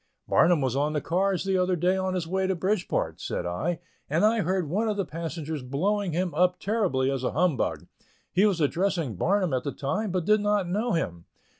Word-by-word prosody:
"Barnum 170 -2 +4
was 130 -2 0
on 145 +2 +1
the 150 - +1
cars 185 +4 0
the 190 -1 +1
other 180 0 +2
day, 180 +3 +2
on 190 0 -1
his 180 -3 -1
way 190 +3 0
to 190 - 0
Bridgeport," 185 +2 -1
said - - -3
I, 155 - -2 0.3
"and 165 +7 +3
I 225 +1 +3
heard 185 -1 0
one 210 +8 0
of 210 - -1
the 200 - 0
passengers 160 -2 -5
blowing 180 +10 -1
him 175 +1 -1
up 180 +3 +2
terribly 185 -12 +1
as 135 -2 -2
a - - -1
humbug. 165 -3 0 0.5
He 195 +4 +4
was 190 -5 0
addressing 165 - 0
Barnum 185 - +1
at 130 -1 0
the 140 - -2
time, 190 +12 -2
but 180 -2 -1
did 215 +1 +4
not 205 -3 +1
know 215 +6 0
him. 85 - -2
180 Hz, 210 wpm, -27 LUFS, 150-195 Hz, 0.5 s, Barnum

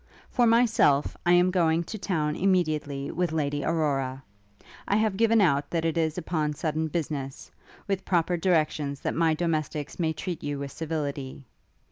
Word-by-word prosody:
For 240 -1 +3
myself, 225 - +3
I 175 - +6
am 180 +1 +4
going 170 -2 +2
to 170 - -7
town 155 -6 -1
immediately 155 -7 0
with 175 -1 -1
Lady 145 -2 -1
Aurora. 135 -5 -1 0.6
I 200 - +2
have 215 -2 +1
given 225 +2 +3
out 145 -6 +2
that 165 -1 -1
it 165 - 0
is 160 -1 0
upon 155 -3 -1
sudden 155 +1 -2
business, 145 -5 -4 0.4
with 195 -1 -1
proper 175 -1 +1
directions 155 -5 0
that - - -2
my 165 -1 +2
domestics 155 -3 -2
may 160 -2 +1
treat 170 +1 -5
you 145 -1 -3
with 140 0 -5
civility. 145 -4 -4
160 Hz, 160 wpm, -27 LUFS, 145-175 Hz, 0.6 s, I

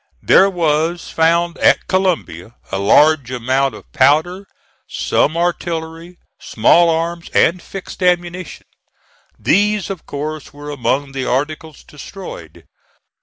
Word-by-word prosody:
There 195 - +5
was 165 -1 -1
found 170 +1 +1
at - - +3
Columbia 165 - -2 0.2
a 95 - -2
large 140 +6 +4
amount 130 +2 -1
of - - -15
powder, 160 +8 +2 0.4
some 155 +3 0
artillery, 170 0 -3 0.2
small 170 +10 +3
arms 170 +1 -2
and 170 +2 +3
fixed 195 +1 -9
ammunition. 180 -1 -1 0.7
These, 205 0 +1
of 185 -4 -8
course 150 +1 -6
were 145 +1 -9
among 140 0 -1
the 135 -1 -4
articles 150 +3 -3
destroyed. 150 - -11
160 Hz, 115 wpm, -17 LUFS, 140-175 Hz, 0.7 s, There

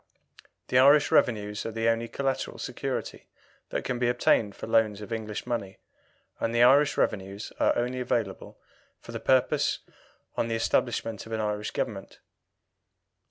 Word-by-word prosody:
The 125 - +4
Irish 145 +3 +6
revenues 105 -3 +2
are 115 - -4
the 115 +1 -1
only 115 0 +1
collateral 135 +3 -2
security - - -5 0.4
that - - -3
can 125 -2 -2
be 120 -1 +2
obtained 115 -4 +2
for - - -7
loans 110 -2 +2
of 105 +2 -6
English 110 -2 -4
money, 100 -5 -3 0.6
and 115 +1 -1
Irish 140 +5 +5
revenues 100 0 -2
are - - +3
only 125 +1 -1
available 115 -5 -2 0.4
for - - -11
the - - -5
purpose - - +2 0.6
on 115 - 0
the 115 - -1
establishment 115 -1 -1
of 115 - -7
an 110 - -1
Irish 105 -1 -2
Government. - - -4
115 Hz, 150 wpm, -27 LUFS, 105-125 Hz, 0.6 s, Irish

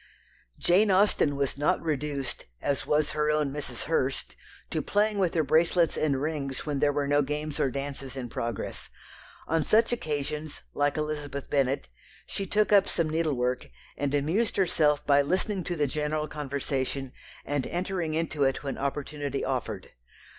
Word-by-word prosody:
Jane 200 +5 +4
Austen 190 -6 +4
was 140 0 -1
not 145 - +3
reduced, 145 -4 -3
as 140 - -1
was 150 0 +2
her 150 0 +1
own 150 -2 +1
Mrs. 135 -5 -4
Hurst, 135 -4 -1 0.4
to - - 0
playing 210 0 +1
with 180 -3 +1
her 160 - +3
bracelets 165 +2 +3
and 140 -4 +1
rings 140 -2 -2
when 145 -2 -1
there 145 0 +4
were 145 0 0
no 145 +1 +4
games 150 +1 -3
or 135 - +3
dances 140 0 -5
in 130 -2 -4
progress. 115 -2 -4 0.6
On 160 -1 +2
such 225 +7 +4
occasions, 150 -5 -3
like 145 +1 +1
Elizabeth 150 -2 -3
Bennet, 135 - +1 0.4
she 195 - -4
took 210 +2 +2
up 200 - +6
some 165 -3 0
needlework, 130 -6 0 0.3
and 145 0 -1
amused 165 +11 +1
herself 155 -6 +3
by 145 -1 +5
listening 185 +5 0
to 175 - -2
the 150 -3 +2
general 150 +2 -1
conversation, 140 -2 -2 0.3
and 145 -2 -1
entering 175 -3 -2
into 160 -3 0
it 135 +1 +1
when 135 -1 -3
opportunity 140 0 -2
offered. - - -3
150 Hz, 160 wpm, -28 LUFS, 140-160 Hz, 0.6 s, up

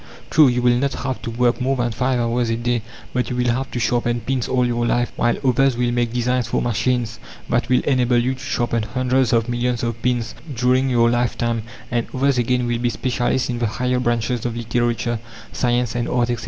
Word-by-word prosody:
True, 155 -1 +6
you 125 -1 +1
will 120 0 +4
not 140 +1 0
have 130 -2 -4
to - - -5
work 120 +2 +1
more 135 +2 +1
than 120 -2 -1
five 125 +2 0
hours 120 0 0
a 115 - +1
day, 120 0 0 0.3
but 125 -1 0
you 125 - -2
will 125 0 +1
have 130 +2 -2
to 120 - -4
sharpen 120 0 0
pins 125 +1 -1
all 125 -1 +2
your 120 -1 0
life, 120 0 +1
while 120 0 +1
others 130 0 +3
will 120 0 +1
make 120 -1 0
designs 125 0 0
for - - 0
machines 120 0 -1 0.3
that 120 -1 0
will 125 - +4
enable 125 -3 +2
you 125 +2 +1
to 130 - -10
sharpen 120 -4 -1
hundreds 130 +2 +1
of 115 -1 +2
millions 120 0 -1
of 115 -1 -3
pins 120 -2 0 0.2
during 130 +2 +2
your 115 -2 +3
life 120 0 0
time; 115 -1 0 0.3
and 120 -1 0
others 135 0 +2
again 125 +1 +1
will 120 -1 -1
be 120 0 +1
specialists 125 +1 0
in 120 - -3
the 120 - +1
higher 125 +3 -1
branches 120 -1 0
of 120 -1 -3
literature, 120 0 -1 0.3
science, 120 -2 0
and 120 0 -2
art, 120 -1 +1
etc. 120 - -2
120 Hz, 220 wpm, -21 LUFS, 120-125 Hz, 0.3 s, True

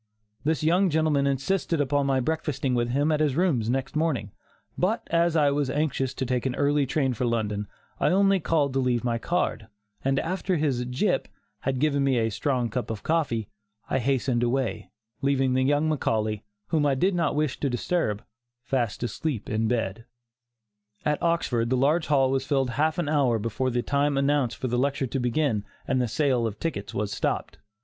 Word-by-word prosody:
This 155 -1 0
young 180 +4 +3
gentleman 155 -3 +2
insisted 155 +5 0
upon 145 0 +1
my 135 -1 +2
breakfasting 140 -2 -1
with 120 -1 +1
him 145 +5 +1
at 155 - +1
his 150 -4 +1
rooms 145 -11 +1
next 135 +2 -2
morning, 150 -10 0 0.4
but 210 +6 0
as 170 0 +3
I 145 -3 +4
was 140 -1 0
anxious 135 -2 -1
to 130 - -2
take 125 0 0
an 130 - -2
early 145 -1 +2
train 135 -1 +1
for 125 +2 -2
London, 105 -3 -1 0.3
I - - +3
only 195 +1 +4
called 150 -5 +1
to 135 - +1
leave 125 -2 +1
my 120 -1 0
card, 170 -7 -1 0.4
and 135 0 +1
after 185 +4 -1
his 135 -5 0
"gyp" 135 +10 0 0.3
had 135 -1 -1
given 140 0 +2
me 135 -2 +2
a 115 -1 +1
strong 125 +2 0
cup 125 -2 -3
of 110 -2 -5
coffee, 145 -10 0 0.4
I - - +2
hastened 130 -1 +1
away, 120 +1 -1 0.3
leaving 135 -2 +2
the 130 - +2
young 145 +3 +2
Macaulay, 110 -8 0 0.3
whom 155 -2 +2
I 140 -2 +3
did 185 +9 +2
not 170 -4 0
wish 150 -2 0
to 140 - 0
disturb, 120 - -1 0.4
fast 120 -4 -1
asleep 120 -1 -3
in 110 +1 +1
bed. 115 -2 -2 1.0
At 150 0 +1
Oxford 130 -9 +1
the 130 - +2
large 150 +6 +2
hall 135 -2 +3
was 135 0 0
filled 135 -4 +1
half 155 +6 +1
an 175 -4 -1
hour 140 -6 +2
before 115 +4 -1
the 120 -1 -1
time 140 0 +1
announced 140 -3 +1
for 130 - -3
the 120 0 0
lecture 140 0 0
to 135 +2 -3
begin 125 -3 0 0.2
and 130 -1 +1
the 125 - +1
sale 130 -2 +1
of 105 -1 -6
tickets 105 -12 -3
was 105 0 -2
stopped. - - -2
135 Hz, 190 wpm, -26 LUFS, 120-150 Hz, 1.0 s, I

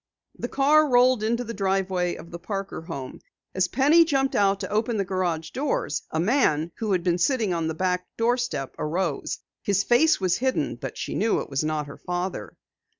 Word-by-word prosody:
The - - -4
car 300 +2 +4
rolled 250 -1 +4
into 235 +3 0
the 230 -1 -6
driveway 190 -3 0
of 170 - -11
the 170 - -7
Parker 195 +1 -5
home. 140 -6 -7 0.3
As 185 -1 +1
Penny 290 - +5
jumped 270 -4 0
out 195 -1 +3
to 190 - -5
open 220 +2 0
the 200 - 0
garage 175 -4 -2
doors, 390 - -1
a 160 - -2
man, 170 - +2
who 215 -3 -1
had 180 -2 0
been 175 -1 +1
sitting 220 -1 +1
on 165 -2 -1
the 160 - -3
back 180 +1 -1
doorstep, 235 - 0
arose. 165 -1 -2 0.2
His 200 -1 +1
face 305 +8 +4
was 185 -2 +1
hidden, 260 +1 0
but - - -7
she - - -4
knew 225 - +1
it - - -7
was 135 +2 0
not 155 -1 -1
her 140 - -10
father. 175 - -4
195 Hz, 195 wpm, -25 LUFS, 170-245 Hz, 0.3 s, Penny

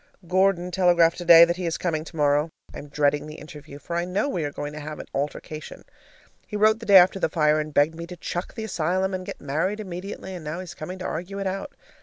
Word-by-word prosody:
Gordon 185 0 +2
telegraphed 175 -2 +3
today 170 -1 +8
that 170 +1 -2
he 180 -2 -3
is 165 - -1
coming 160 -3 -2
tomorrow. 150 -1 +1 0.2
I - - -7
am 145 - -10
dreading 145 +1 0
the 155 - -9
interview, 150 -2 -11
for 170 +3 -6
I 170 - 0
know 180 +9 -1
we 180 - -2
are 145 - -3
going 145 +1 -6
to 150 - -7
have 150 0 -7
an - - -8
altercation. 150 +2 -5 0.6
He 210 - -7
wrote 215 +1 +4
the 230 - -9
day 200 -2 +9
after 185 +1 +5
the - - +1
fire 155 -2 +2
and 155 0 -4
begged 145 +2 +3
me 170 +1 -8
to 180 0 -9
"chuck 175 +2 -5
the 225 - -5
asylum" 185 -1 -1
and 185 0 -4
get - - -7
married 160 +9 -2
immediately, 190 0 -7
and 175 -3 -7
now 155 +3 -4
he's 185 -2 -7
coming 180 +4 -7
to 185 - -7
argue 180 +5 -4
it 195 - -3
out. 195 +1 -4
170 Hz, 245 wpm, -24 LUFS, 155-185 Hz, 0.6 s, day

